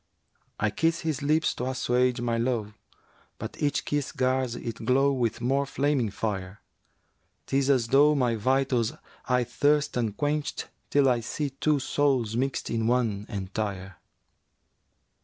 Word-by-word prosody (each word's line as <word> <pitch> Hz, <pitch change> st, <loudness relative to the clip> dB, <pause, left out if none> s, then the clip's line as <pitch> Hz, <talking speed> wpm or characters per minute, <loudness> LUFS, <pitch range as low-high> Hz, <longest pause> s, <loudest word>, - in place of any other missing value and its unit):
I 105 Hz, 0 st, +1 dB
kiss 165 Hz, +8 st, 0 dB
his 155 Hz, -4 st, -2 dB
lips 155 Hz, +3 st, +2 dB
to 125 Hz, -, -4 dB
assuage 125 Hz, -1 st, +1 dB
my 120 Hz, -1 st, 0 dB
lowe; 115 Hz, -3 st, -1 dB, 0.3 s
* -, -, -34 dB
But -, -, -7 dB
each 145 Hz, -1 st, 0 dB
kiss 145 Hz, -2 st, -1 dB
gars 130 Hz, -2 st, 0 dB
it 115 Hz, -1 st, -6 dB
glow 135 Hz, +2 st, +3 dB
with 120 Hz, -3 st, -1 dB
more 135 Hz, +3 st, +1 dB
flaming 135 Hz, -4 st, 0 dB
fire; 100 Hz, -2 st, -4 dB, 0.9 s
'Tis 135 Hz, 0 st, +1 dB
as 130 Hz, -4 st, +3 dB
though 145 Hz, +3 st, +5 dB
my 125 Hz, -4 st, +2 dB
vitals 125 Hz, 0 st, +1 dB, 0.3 s
aye 125 Hz, -1 st, +2 dB
thirst 145 Hz, +4 st, +1 dB
unquencht 145 Hz, +7 st, -2 dB
* -, -, -45 dB
Till 140 Hz, -1 st, +4 dB
I 125 Hz, -2 st, +3 dB
see 140 Hz, +5 st, -3 dB
two 150 Hz, +3 st, +1 dB
souls 130 Hz, -5 st, +1 dB
mixt 135 Hz, +2 st, -1 dB
in 115 Hz, -1 st, 0 dB
one 115 Hz, -4 st, 0 dB
entire.' 95 Hz, -1 st, -4 dB
125 Hz, 145 wpm, -27 LUFS, 115-140 Hz, 0.9 s, though